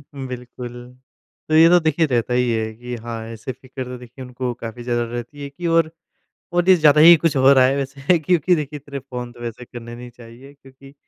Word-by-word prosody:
बिल्कुल। 125 -2 -7 0.8
तो 155 - +2
ये 165 +1 +8
तो 180 - +6
देखिए 160 +1 +2
रहता 125 -1 0
ही 125 0 +1
है 110 -1 -2
कि 120 +2 -7
हाँ, 115 -1 -7
ऐसे 115 +3 -7
फिक्र 130 +1 -8
तो 125 0 -8
देखिए 125 +2 -12
उनको 125 0 -4
काफ़ी 115 +1 -8
ज़्यादा 120 -1 -1
रहती 120 +4 -7
है 140 - -6
कि 170 +4 -6
और 165 -1 +2 0.6
और 175 +1 +1
ये 185 - +9
ज़्यादा 150 -2 +5
ही 170 +2 +9
कुछ 165 -4 +1
हो 135 +1 +6
रहा 130 -1 +5
है 135 +2 +2
वैसे। 140 +5 0
क्योंकि 175 +2 +2
देखिए 150 0 -5
इतने 140 0 -8
फ़ोन 125 -2 -8
तो 120 - -17
वैसे 120 +1 -7
करने 120 -1 -10
नहीं 120 0 -10
चाहिए, 120 +3 -15
क्योंकि 135 0 -18
130 Hz, 215 wpm, -20 LUFS, 120-145 Hz, 0.8 s, ये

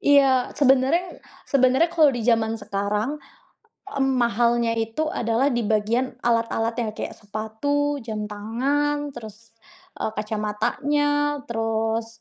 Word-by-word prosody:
Iya, 270 -3 +4
sebenarnya 280 +6 +2 0.2
sebenarnya 265 +4 +3
kalau 315 -3 +5
di 230 - -3
zaman 225 -1 +2
sekarang, 205 +3 -2 0.7
mmm, 270 -8 0
mahalnya 235 0 +2
itu 225 +8 -2 0.2
adalah 240 +4 +1
di - - +1
bagian 225 +4 0
alat-alatnya, 230 0 0
kayak - - -4
sepatu, 250 +8 -2
jam 215 -3 -4
tangan, 275 +8 -1
terus, 225 0 -11 0.5
eee, - - 0
kacamatanya, 215 +7 -1 0.4
terus, 225 -2 -1
235 Hz, 110 wpm, -23 LUFS, 220-275 Hz, 0.7 s, kalau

